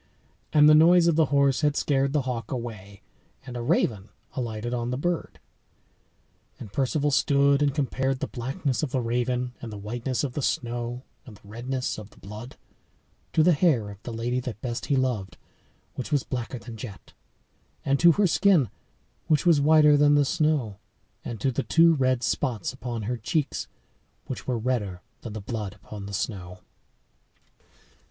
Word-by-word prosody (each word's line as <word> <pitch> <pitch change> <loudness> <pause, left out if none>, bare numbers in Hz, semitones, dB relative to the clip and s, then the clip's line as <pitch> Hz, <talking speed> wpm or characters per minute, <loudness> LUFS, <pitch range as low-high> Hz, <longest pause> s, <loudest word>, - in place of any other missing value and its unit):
And 150 -1 +6
the 155 - +8
noise 170 +3 +6
of 170 -2 +3
the 160 0 +4
horse 140 -1 +2
had 150 -1 +2
scared 140 -1 +1
the 145 -1 +1
hawk 120 -4 -4
away, 105 -6 -7 0.4
and 125 -2 -8
a 120 - -3
raven 115 - 0 0.2
alighted 120 -1 -3
on 120 -1 -2
the 125 - -2
bird. 175 +4 -2 1.2
And 100 - -10
Perceval 145 +2 +1
stood 140 0 +3
and 145 -1 +3
compared 135 -2 0
the - - -1
blackness 130 +3 -3
of 155 - -1
the 130 - -1
raven 125 +1 -1
and 115 - -7
the 105 - -7
whiteness 120 +6 -3
of 135 -4 -3
the 145 - -3
snow 120 0 -2 0.2
and 110 -5 -13
the 100 - -20
redness 125 +3 -3
of 105 -1 -10
the - - -22
blood 105 +5 -9 0.8
to 160 - +4
the 175 +2 +5
hair 140 - +2
of 100 0 -13
the 120 - -7
lady 120 +2 -1
that 125 -4 -6
best 120 -1 -4
he 140 - +2
loved, 125 -8 -1 0.6
which 130 - -6
was 145 -3 +2
blacker 125 0 -4
than 115 -1 -9
jet, 110 -3 -10 0.7
and 140 0 +2
to 170 -1 +7
her 205 +3 +2
skin, 175 - +3 0.6
which 155 +2 +2
was 165 -5 +5
whiter 150 0 +6
than 145 0 +5
the 145 -1 +4
snow, 145 - 0 0.4
and 115 -3 -6
to 135 - +1
the 135 - -1
two 165 +7 +5
red 130 -4 +1
spots 120 -6 -1
upon 120 -4 -5
her 120 +4 -2
cheeks, 140 +6 -2 0.6
which - - -7
were 125 -2 0
redder 110 -7 -2 0.2
than 115 - -7
the 110 - -5
blood 105 -1 -5
upon 100 0 -9
the - - -7
snow. 90 -2 -4
125 Hz, 175 wpm, -26 LUFS, 115-145 Hz, 1.2 s, the